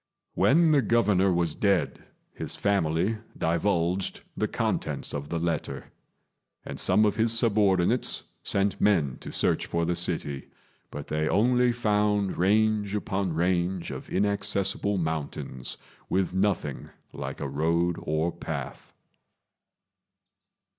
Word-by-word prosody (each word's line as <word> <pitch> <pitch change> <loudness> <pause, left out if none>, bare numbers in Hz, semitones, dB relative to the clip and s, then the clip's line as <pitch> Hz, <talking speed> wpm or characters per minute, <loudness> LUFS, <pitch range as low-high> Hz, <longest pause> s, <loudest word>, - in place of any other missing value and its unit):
When 165 +3 +4
the 145 -2 +5
Governor 105 -6 +3
was 85 -3 +1
dead, 100 -1 0 0.3
his - - -5
family 100 +2 0 0.2
divulged 85 +2 0
the - - 0
contents - - -2
of 70 0 -5
the 85 - -2
letter; 85 -1 -3 0.7
and - - -6
some 110 - +4
of 105 - +1
his 115 0 +3
subordinates 105 -1 +2 0.2
sent 100 0 0
men 80 -11 +2
to - - -7
search - - 0
for 85 0 0
the 85 +1 0
city, 70 -4 -2 0.4
but 70 0 -7
they 75 0 -1
only 125 +3 +3
found 105 -4 +1
range 105 +1 +2
upon 100 -4 -2
range 90 +2 0
of - - -8
inaccessible 100 0 0
mountains, 80 -6 -3 0.3
with 95 -1 0
nothing 95 -7 -1 0.2
like - - -6
a 75 - -3
road 85 +5 0
or 80 +2 -1
path. - - -6
95 Hz, 120 wpm, -27 LUFS, 85-105 Hz, 0.7 s, the